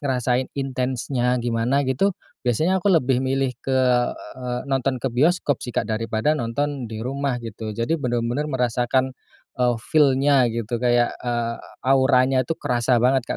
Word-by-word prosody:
ngerasain 130 -2 0
intensnya 130 -1 -1
gimana 120 +3 0
gitu, 160 +10 +1 0.2
biasanya 160 +10 +1
aku 200 - +1
lebih 130 -8 +3
milih 135 0 0
ke 135 -1 -1 0.4
eee, 125 -1 -6
nonton 135 0 +1
ke 130 - 0
bioskop 145 +1 +2
sih - - -7
Kak 120 - -1
daripada 110 +4 0
nonton 135 -1 -2
di 110 - -7
rumah 135 0 -1
gitu, 110 -1 -6
jadi 115 +8 0
bener-bener 120 +2 -1
merasakan, 125 0 0 0.4
eee, 125 -1 +2
feel-nya 140 -3 +3
gitu 115 0 -3
kayak, 120 -1 +2
eee, 120 -1 -2 0.3
auranya 130 -1 +4
itu 165 - -2
kerasa 120 0 +1
banget 130 +1 +3
Kak - - -2
125 Hz, 150 wpm, -23 LUFS, 120-135 Hz, 0.4 s, auranya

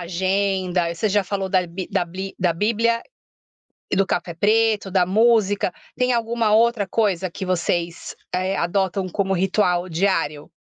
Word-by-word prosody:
agenda, 185 -1 0
você 215 +5 -1
já 205 0 +2
falou 195 -1 -3
da 185 -1 +1
bi 180 +2 -6
da 175 - +1
bli 190 +3 -7
da 175 -2 +2
bíblia 230 +5 +1 0.9
e - - 0
do 195 - +4
café 175 -2 -2
preto, 215 +1 +2
da 180 -2 +2
música, 205 -2 +2 0.2
tem 250 0 +1
alguma 230 -2 0
outra 225 -2 +3
coisa 190 -4 0
que 190 - -6
vocês, 175 -1 -2 0.2
eh, 185 +1 0
adotam 190 +1 -1
como 195 +1 -1
ritual 185 -1 +1
diário? 165 -4 -1
190 Hz, 150 wpm, -22 LUFS, 180-210 Hz, 0.9 s, do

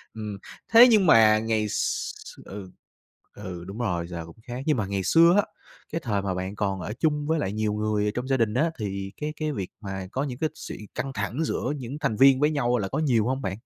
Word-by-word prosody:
Ừm, 105 -2 -5 0.4
thế 235 +2 +10
nhưng 215 -4 +5
mà 110 -7 +6
ngày 110 -1 0
x - - -1 0.3
ừ, 95 -2 -9 0.6
ừ, 90 -4 -7
đúng 100 +4 -7
rồi, 90 -8 -1
giờ 85 -2 -6
cũng 85 - -14
khác, 120 +1 -6
nhưng 150 -5 +2
mà 105 - 0
ngày 100 0 -2
xưa 165 - +6
á, 205 - +4 0.5
cái 165 - -1
thời 105 -4 0
mà 95 -1 -2
bạn 95 +2 -4
còn 100 -2 -1
ở 105 - -4
chung 150 -2 +1
với 160 0 +1
lại 95 -7 -2
nhiều 110 -1 -1
người 105 0 0
ở 105 - +1
trong 125 +2 -3
gia 135 - +2
đình 115 -3 +1
á, 155 +7 +1
thì 100 -2 -4
cái 150 0 -2
cái 155 -1 -2
việc 95 -8 -4
mà 95 -2 -5
có 135 - -1
những 130 -4 -4
cái 155 - 0
sự - - -8 0.2
căng 135 0 -3
thẳng 110 +8 -2
giữa 140 -2 -2
những 130 +3 -6
thành 140 -7 0
viên 135 +1 +6
với 150 +2 +3
nhau 125 -5 +1
là 100 - -2
có 140 +9 -2
nhiều 120 -8 +2
hông 130 +1 -1
bạn? 95 - -2
110 Hz, 245 wpm, -26 LUFS, 100-140 Hz, 0.6 s, thế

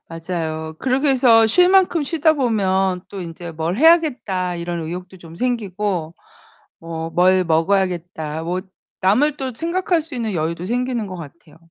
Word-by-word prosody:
맞아요. 160 -1 -4
그러기 265 +2 0
위해서 245 -4 +5
쉴만큼 360 - +4
쉬다 315 +1 +2
보면 190 -8 +1
또 200 -2 -7
인제 170 0 -7
'뭘 165 +4 -2
해야겠다.' 245 - +3
이런 170 0 -4
의욕도 180 +3 -7
좀 165 -1 -13
생기고 205 -7 -2 0.7
뭐 165 0 -5
'뭘 185 +1 +4
먹어야겠다.' 165 -2 -1
뭐 180 +2 -2 0.4
남을 270 +11 +3
또 260 -2 -4
생각할 340 - 0
수 305 -4 -9
있는 225 -4 -2
여유도 170 +2 -2
생기는 245 -1 -1
것 185 - -7
같아요. 165 -1 -12
190 Hz, 310 characters per minute, -20 LUFS, 170-255 Hz, 0.7 s, 위해서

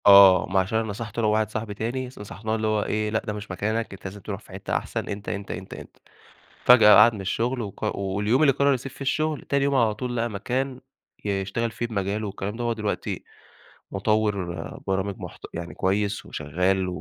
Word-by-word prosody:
آه، 100 -2 +9
ما 95 +1 +3
عشان 100 +4 0
أنا 115 - -2
نصحته 110 +2 -5
أنا 110 - +2
وواحد 110 0 +2
صاحبي 110 -1 -4
تاني 120 +5 -3
نصحناه، 110 -2 -5
اللي 110 0 -1
هو 110 -1 +1
إيه، 105 0 -1
لأ، 110 +1 +1
ده 105 - -2
مش 105 -1 -7
مكانك، 110 +3 -2
أنت 100 - -12
لازم 100 +2 -6
تروح 100 0 -5
في - - -17
حتّة 95 - -1
أحسن، - - -4
أنت، 100 -1 -5
أنت، 100 0 -4
أنت، 95 +1 -8 0.7
فجأة 110 -4 +9
قعد 115 +2 +8
من 105 - -6
الشغل، 120 +6 -1
وق 100 -4 -3
واليوم 105 +7 +1
اللي 140 -3 +6
قرّر 140 +1 +3
يسيب 130 +1 -5
فيه - - -16
الشغل، 155 +2 0
تاني 140 -1 +1
يوم 140 0 +2
على 115 -5 +3
طول 125 +2 -4
لقى 115 0 0
مكان 125 +6 -2 0.4
يشتغل 100 +3 -1
فيه 120 +2 -3
بمجاله 105 -1 -2
والكلام 100 +1 -4
ده، 120 - -3
هو 120 - +1
دلوقتي 105 -2 -3 0.7
مُطوّر 100 -4 -1
برامج 95 +1 0
محت - - -9
يعني 85 0 -5
كويس 100 +2 0
وشغال، 90 +6 0
105 Hz, 200 wpm, -25 LUFS, 100-115 Hz, 0.7 s, آه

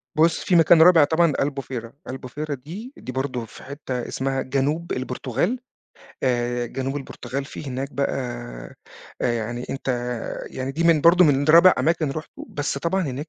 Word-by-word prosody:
بُص، 160 +1 +3
فيه 185 - +2
مكان 165 0 +6
رابع 170 -2 +8
طبعًا 160 +1 +3
ألبوفيرا، 135 -4 -3 0.2
ألبوفيرا 135 +3 -5
دي، 185 - -9
دي - - -7
برضو 130 -2 -3
في 110 - -14
حتّة 135 -3 -5
اسمها 135 0 -2
جنوب 145 +6 -1
البرتغال، 130 - -2 0.6
آآ، 120 -1 0
جنوب 135 +3 -3
البرتغال 135 -1 -5
فيه 150 - -8
هناك 135 +2 -4
بقى 140 0 0 1.1
آآ، 120 - +2
يعني 120 +2 -3
أنت 135 - -5 0.6
يعني 130 +1 -4
دي 165 +4 -1
من 165 -2 +5
برضو 170 +3 +6
من 145 -3 +3
رابع 170 +4 +8
أماكن 160 -2 +1
رُحته، 155 +3 -7
بس 145 -1 -2
طبعًا 185 +6 0
هناك 145 0 -4
140 Hz, 160 wpm, -23 LUFS, 130-160 Hz, 1.1 s, رابع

